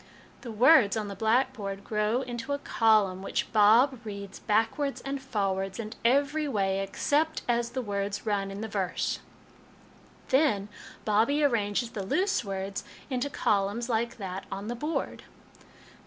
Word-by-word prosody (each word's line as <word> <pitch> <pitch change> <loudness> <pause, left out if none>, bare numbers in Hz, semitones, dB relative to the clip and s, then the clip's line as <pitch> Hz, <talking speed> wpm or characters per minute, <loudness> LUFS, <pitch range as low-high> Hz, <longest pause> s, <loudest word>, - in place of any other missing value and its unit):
The 240 - -7
words 230 -1 +5
on 210 -2 -3
the 200 - -6
black 240 +6 +2
board 200 -4 -6
grow 215 +4 0
into 250 +2 -4
a - - 0
column, 215 -8 +2
which 195 - -3
Bob 225 +5 +5
reads 200 -2 -7
back 225 +5 +1
wards 280 -1 -1
and 275 0 -4
forwards, 195 -6 -2
and 220 -1 -5
every 285 +5 +2
way, 195 -6 0
except 290 +11 0
as 235 -1 +1
the 255 +1 -3
words 200 -1 -3
run 200 -2 0
in 195 +1 -6
the 220 - -3
verse. 195 -4 -2 0.6
" - - -27
Then 260 -8 +2 0.4
Bobbie 230 +8 +2
arranges 230 -3 +1
the 205 - -4
loose 375 - +1
words 195 -1 -4 0.3
into 255 +2 -1
columns 210 0 0
like 235 0 -1
that 190 -2 -5
on 200 +3 -5
the 240 - -2
board. 300 +7 -3
220 Hz, 155 wpm, -28 LUFS, 200-260 Hz, 0.6 s, words